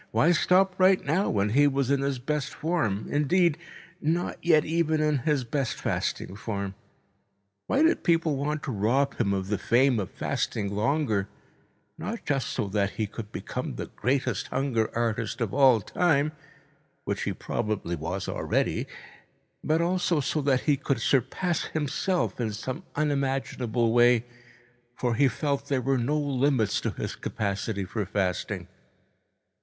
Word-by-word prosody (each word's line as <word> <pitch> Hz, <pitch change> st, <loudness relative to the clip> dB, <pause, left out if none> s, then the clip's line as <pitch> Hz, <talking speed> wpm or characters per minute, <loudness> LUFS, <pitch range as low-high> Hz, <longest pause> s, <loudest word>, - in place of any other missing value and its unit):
Why 170 Hz, -, +3 dB
stop 185 Hz, +2 st, +3 dB
right 185 Hz, 0 st, +4 dB
now, 165 Hz, +8 st, +1 dB
when 100 Hz, 0 st, +1 dB
he 145 Hz, +6 st, +5 dB
was 135 Hz, -1 st, 0 dB
in 140 Hz, -1 st, +2 dB
his 140 Hz, -1 st, 0 dB
best 145 Hz, +3 st, -3 dB
form, 130 Hz, -, -1 dB
indeed, 160 Hz, +3 st, +3 dB, 0.5 s
not 165 Hz, +4 st, -1 dB
yet 160 Hz, -3 st, +4 dB
even 160 Hz, -1 st, +1 dB
in 150 Hz, -2 st, +2 dB
his 145 Hz, +1 st, +1 dB
best 130 Hz, +1 st, -2 dB
fasting 95 Hz, -, -2 dB
form? 100 Hz, -2 st, -4 dB, 0.9 s
Why 280 Hz, -, +3 dB
did 330 Hz, +1 st, +3 dB
people 165 Hz, -3 st, +2 dB
want 145 Hz, +2 st, -2 dB
to 140 Hz, -, -3 dB
rob 120 Hz, +6 st, +1 dB
him 105 Hz, -4 st, +2 dB
of 95 Hz, -1 st, -2 dB
the 105 Hz, -, 0 dB
fame 125 Hz, 0 st, +3 dB
of 95 Hz, -, -3 dB
fasting 100 Hz, -2 st, -2 dB
longer, 110 Hz, -3 st, +1 dB, 0.7 s
not 225 Hz, 0 st, -5 dB
just 140 Hz, -3 st, 0 dB
so 115 Hz, -5 st, -2 dB
that 100 Hz, 0 st, 0 dB
he 110 Hz, 0 st, -1 dB
could 105 Hz, 0 st, -8 dB
become -, -, -5 dB
the -, -, -6 dB
greatest 130 Hz, -5 st, 0 dB
hunger 130 Hz, -5 st, 0 dB
artist 115 Hz, 0 st, -1 dB
of 115 Hz, -5 st, -2 dB
all 130 Hz, -5 st, +5 dB
time, 150 Hz, -, +1 dB, 0.7 s
which -, -, -2 dB
he -, -, -1 dB
probably 105 Hz, -5 st, -2 dB
was 90 Hz, +5 st, -4 dB
already, -, -, -1 dB, 0.8 s
but 155 Hz, +2 st, +2 dB
also 175 Hz, -2 st, +1 dB
so 150 Hz, +2 st, 0 dB
that 135 Hz, -2 st, +2 dB
he 145 Hz, -2 st, +2 dB
could 135 Hz, -2 st, -1 dB
surpass 155 Hz, +9 st, +1 dB
himself 155 Hz, +1 st, -1 dB
in 110 Hz, -2 st, -1 dB
some 125 Hz, +4 st, -5 dB
unimaginable 135 Hz, -5 st, 0 dB
way, 120 Hz, -1 st, +5 dB, 0.7 s
for 120 Hz, -2 st, 0 dB
he 135 Hz, +4 st, +4 dB
felt 140 Hz, 0 st, -2 dB
there 140 Hz, -2 st, +1 dB
were 135 Hz, +1 st, +1 dB
no 140 Hz, +6 st, 0 dB
limits 135 Hz, -5 st, +1 dB
to -, -, -1 dB
his -, -, -4 dB
capacity 100 Hz, 0 st, -3 dB
for 105 Hz, +3 st, -3 dB
fasting. 95 Hz, -2 st, -2 dB
135 Hz, 155 wpm, -27 LUFS, 110-150 Hz, 0.9 s, he